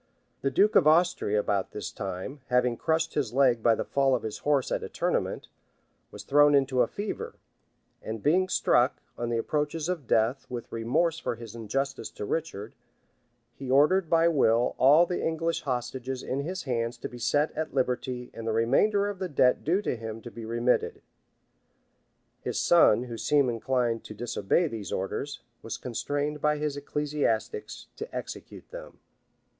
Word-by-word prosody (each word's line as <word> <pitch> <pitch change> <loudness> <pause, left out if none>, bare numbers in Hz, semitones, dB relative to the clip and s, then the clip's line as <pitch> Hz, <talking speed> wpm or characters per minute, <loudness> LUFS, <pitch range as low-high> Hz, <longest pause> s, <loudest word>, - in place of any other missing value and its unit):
The 135 - +1
duke 205 - +3
of 160 - +6
Austria, 155 - +3
about 100 -2 -1
this 105 - -5
time, 100 +8 -6
having 125 -1 +2
crushed 160 +5 0
his 130 -7 -1
leg 125 -4 +3
by 115 0 +4
the - - -3
fall 135 -1 +2
of 125 - -3
his 110 -1 -5
horse 145 -3 +1
at - - 0
a - - -6
tournament, - - -2 0.6
was 105 - -10
thrown 145 +4 +5
into 135 -2 +2
a 120 - +3
fever; 205 +1 -5 0.7
and 110 -1 -6
being 185 +5 +3
struck, - - +2 0.2
on 120 0 -3
the 120 - 0
approaches 150 +6 -1
of 170 -8 -3
death, 115 +5 +1
with 120 -2 -6
remorse 150 +9 0
for 120 - -3
his 115 -2 -10
injustice 135 +3 -3
to - - -7
Richard, 110 -8 -4 0.8
he 135 +1 -8
ordered 155 +6 +4
by 165 0 +4
will 125 -7 +3
all 145 +6 +7
the 175 0 -3
English 165 +1 -1
hostages 130 0 -3
in 135 - -2
his 180 +6 -4
hands 115 -3 -2
to - - -5
be 120 - -11
set 145 +6 +1
at 155 -2 -4
liberty 125 -1 -2
and 115 0 -7
the 110 - 0
remainder 200 - +2
of 205 -2 -5
the 185 -1 -3
debt 125 -3 +3
due 185 +7 +1
to - - -1
him 115 -1 -6
to 120 - -8
be 115 -1 -8
remitted: 120 +2 0 1.4
his - - -2
son, 145 -9 +5
who 120 -2 -7
seemed 140 -4 +2
inclined 120 0 -1
to 105 - -9
disobey 120 - 0
these 110 -7 -6
orders, 125 +8 -3 0.2
was 115 - -5
constrained 145 +4 -3
by 150 0 +2
his 150 -1 -2
ecclesiastics 150 - -2
to 450 - -8
execute - - -7
them. - - -10
130 Hz, 170 wpm, -28 LUFS, 115-155 Hz, 1.4 s, all